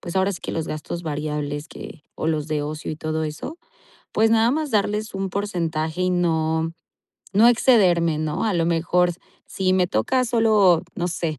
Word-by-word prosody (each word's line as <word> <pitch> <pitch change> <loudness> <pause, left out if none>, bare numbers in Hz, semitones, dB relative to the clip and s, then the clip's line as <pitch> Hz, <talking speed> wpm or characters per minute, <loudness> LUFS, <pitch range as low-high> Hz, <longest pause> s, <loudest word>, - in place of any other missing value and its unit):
pues, 175 +1 -6
ahora 190 +1 +2
sí 180 - -6
que - - -4
los 160 - -2
gastos 160 +3 -5
variables 150 0 -3
que 150 - -10
o - - -4
los 155 -1 -1
de 150 -1 -1
ocio 155 +1 -5
y 155 - -5
todo 155 0 -2
eso, 160 - -6 0.5
pues, 225 +1 +3
nada 225 +1 +4
más 300 +1 -1
darles 210 0 0
un 195 -1 -3
porcentaje 170 -4 -2
y 185 - +1
no 160 -2 0 0.6
no 220 +4 +6
excederme, 180 -10 +4
¿no?, 155 +6 -2
a 210 -4 +1
lo 165 - +1
mejor 175 +1 +2 0.3
si 185 -1 0
me 180 -1 +3
toca 255 +7 +1
solo 215 -7 +4
no 175 0 -1
sé, 165 -3 -3
175 Hz, 185 wpm, -23 LUFS, 155-205 Hz, 0.6 s, no